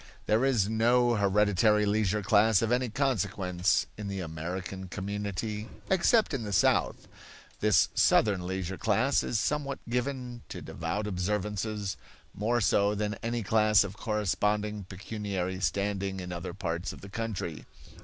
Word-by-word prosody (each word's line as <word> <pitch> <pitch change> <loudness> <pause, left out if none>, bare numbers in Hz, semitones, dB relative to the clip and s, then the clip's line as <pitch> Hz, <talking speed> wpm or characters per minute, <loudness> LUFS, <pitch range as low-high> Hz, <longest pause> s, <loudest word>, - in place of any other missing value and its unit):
There 110 +4 +2
is 120 -8 +2
no 120 +2 +3
hereditary 105 0 +3
leisure 105 0 +1
class 110 +1 +4
of 115 - 0
any 125 0 +1
consequence 100 -8 0
in 105 - -4
the 100 -1 -4
American 90 +3 -5
community, 105 +3 -4 0.2
except 190 +2 +3
in 135 - -1
the 105 -2 -5
South. 95 - +2 0.5
This 105 -2 +4
Southern 95 -4 +3
leisure 95 0 -3
class 115 +6 +2
is 115 - -1
somewhat 140 +3 -1
given 125 0 -3
to - - -6
devout 85 +6 -4
observances; 105 +1 -2 0.4
more 120 +3 0
so 100 0 +3
than 105 0 -1
any 115 0 -2
class 105 0 +4
of 100 -1 -6
corresponding 105 -1 -1
pecuniary 95 -1 -4
standing 100 0 -1
in 90 -1 -6
other 85 0 -5
parts 85 -2 -3
of - - -11
the 100 - -9
country. 105 -7 -4
105 Hz, 140 wpm, -29 LUFS, 95-110 Hz, 0.5 s, class